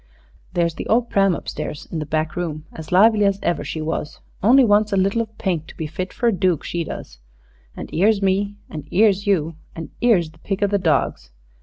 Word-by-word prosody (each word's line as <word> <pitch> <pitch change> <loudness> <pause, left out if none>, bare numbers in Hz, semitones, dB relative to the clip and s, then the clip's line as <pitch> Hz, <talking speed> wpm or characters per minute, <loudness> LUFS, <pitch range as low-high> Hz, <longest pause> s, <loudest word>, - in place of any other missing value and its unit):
There's 170 -2 +1
the - - -6
ole 240 +2 +3
pram 195 -5 +2
up - - -9
stairs 145 - -5
in 165 - -3
the 150 - -5
back 155 +1 -1
room 160 -3 -4
as 160 -1 -9
lively 210 +3 +5
as 200 -1 +2
ever 175 - 0
she 155 - -4
was 155 -1 -4 0.2
only 255 +6 +6
wants 210 0 +3
a 195 - +1
little 195 +4 +2
of 220 -1 -8
paint 170 -6 -2
to - - -13
be 160 - -3
fit 170 +5 -5
for 240 - -1
a 220 - 0
dook, 180 -3 +1
she 170 -1 -2
does. - - -8 0.6
An' - - -6
'ere's 205 +4 +3
me, 200 +1 0
an' 150 -2 -8
'ere's 205 0 +3
you, 165 -5 +1 0.2
an' 160 -2 -7
'ere's 190 -10 +3
the 160 - -22
pick 195 +3 -3
of 200 - +1
the 200 - +2
dogs. 155 - 0
185 Hz, 220 wpm, -21 LUFS, 160-205 Hz, 0.6 s, only